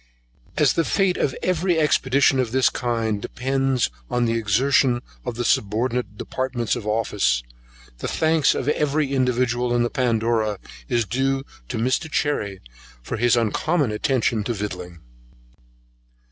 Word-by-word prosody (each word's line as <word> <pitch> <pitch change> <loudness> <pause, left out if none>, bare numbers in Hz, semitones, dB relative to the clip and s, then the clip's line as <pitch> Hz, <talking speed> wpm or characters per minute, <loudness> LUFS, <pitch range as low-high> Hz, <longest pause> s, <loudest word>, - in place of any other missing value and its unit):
As - - +4
the 165 - +1
fate 190 +1 +1
of 130 - 0
every 180 -1 +1
expedition 135 -3 +3
of 125 -3 0
this 130 +1 +3
kind 115 -4 -1
depends 135 - 0
much - - -28
on 120 - +2
the 115 - +1
exertion 120 +3 +2 0.2
of 120 - -2
the 120 +1 -2
subordinate 115 +2 0
departments 130 -2 -2
of 105 - -6
office, 105 - +1 0.6
the - - -3
thanks 160 -2 +2
of 130 - -3
every 150 -1 +1
individual 125 -2 +1
in 120 - +3
the 120 - -1
Pandora 115 -3 0 0.3
is 120 -1 +1
due 135 +3 0 0.3
to - - -3
Mr. 130 +8 0
Cherry, 105 -12 -1 0.4
for 120 - -4
his 120 +1 +3
uncommon 130 - +1
attention 115 0 0
to 120 - -1
the - - -7
victualling. 90 -4 -9
120 Hz, 145 wpm, -23 LUFS, 110-135 Hz, 0.6 s, As